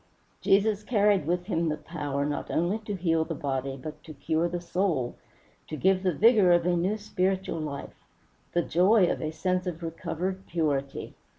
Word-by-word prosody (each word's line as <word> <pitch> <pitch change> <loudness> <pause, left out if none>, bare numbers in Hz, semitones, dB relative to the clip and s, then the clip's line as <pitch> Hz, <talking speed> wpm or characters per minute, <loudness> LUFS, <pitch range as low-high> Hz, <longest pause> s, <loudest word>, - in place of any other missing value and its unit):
Jesus 205 +1 +3
carried 205 - +2
with 175 +1 0
him 170 -4 0
the 155 - -1
power 145 -3 -3
not 145 0 -3
only 175 +6 0
to 205 - -3
heal 165 -3 +1
the 165 0 -5
body 135 -1 -3
but 150 +4 -8
to 155 - -10
cure 160 +4 0
the 175 +1 -3
soul, 170 -8 -1 0.5
to 155 - -5
give 190 +2 +3
the 185 -1 +2
vigor 210 - +5
of 175 -1 +4
a 180 0 +2
new 185 +5 0
spiritual 190 -4 -1
life, 145 -3 -6 0.5
the 175 - +2
joy 185 +5 +4
of - - -3
a 155 - -2
sense 180 +3 -1
of 170 -1 -4
recovered 180 +3 -4
purity. 145 -5 -2
175 Hz, 180 wpm, -27 LUFS, 155-190 Hz, 0.5 s, vigor